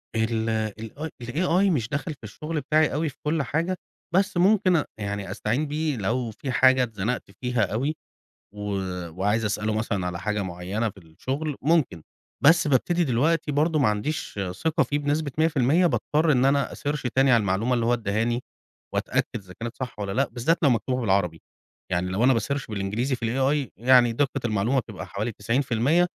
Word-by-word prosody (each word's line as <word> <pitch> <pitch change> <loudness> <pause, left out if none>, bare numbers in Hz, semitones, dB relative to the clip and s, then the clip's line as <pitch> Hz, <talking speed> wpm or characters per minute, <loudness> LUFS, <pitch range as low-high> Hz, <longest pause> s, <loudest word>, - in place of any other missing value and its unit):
ال 110 0 0
ال 110 0 -3 0.3
الAI 175 +9 +2
مش 120 -9 0
دخل 140 +2 -3
في 135 -5 -22
الشغل 150 +8 -4
بتاعي 155 +2 +2
أوي 155 +2 0
في 135 - -14
كل 150 -1 +1
حاجة، 165 +7 -1 0.4
بس 195 0 +2
ممكن، 190 0 +4
آآ، 155 - +2
يعني 100 -2 -4
أستعين 120 +10 -1
بيه 150 0 -1
لو 115 +3 -1
فيه 130 +5 -5
حاجة 130 +1 +5
اتزنقت 115 +1 -2 0.2
فيها 125 -2 0
أوي، 140 +7 0 0.6
و 105 - -9 0.5
وعايز 100 +6 0
أسأله 105 +1 -1
مثلًا 105 -4 -1
على 90 -1 -4
حاجة 105 0 -1
معينة 95 +5 -3
في - - -22
الشغل، 135 - -4
ممكن. 150 - +2 0.4
بس 165 +1 +6
بابتدي 170 +6 +2
دلوقتي 150 +4 +1
برضو 155 +2 +2
معنديش 105 -1 -1 0.2
ثقة 160 -1 +3
فيه 145 - -1
بنسبة 145 0 -1
100%، 160 +2 +3
باضطر 155 -1 +2
إن 130 -1 +3
أنا 140 +1 +2
أsearch 145 0 -3
تاني 135 0 +4
على 120 - +6
المعلومة 105 +5 +1
اللي 115 -1 0
هو 120 - +3
اداهاني، 115 +2 0 0.5
وأتأكد - - 0
إذا 95 -2 -9
كانت 115 +1 -5
صح 125 -4 -6
والّا 100 -1 -3
لأ، 135 +5 +1
بالذات 145 +8 +1
لو 140 - +5
مكتوبة 125 +2 0
بالعربي. 95 -7 0 0.5
يعني 90 +1 0
لو 100 +6 +1
أنا 130 - +5
بsearch 140 +5 -3
بالإنجليزي 105 +6 -1
في 120 - -7
الAI 135 +1 +1
يعني 120 +2 +5
دقة 135 +2 0
المعلومة 115 +4 +1
بتبقى 105 -4 -8
حوالي 105 +4 -3
90%. 125 - +1
125 Hz, 175 wpm, -25 LUFS, 110-150 Hz, 0.6 s, بس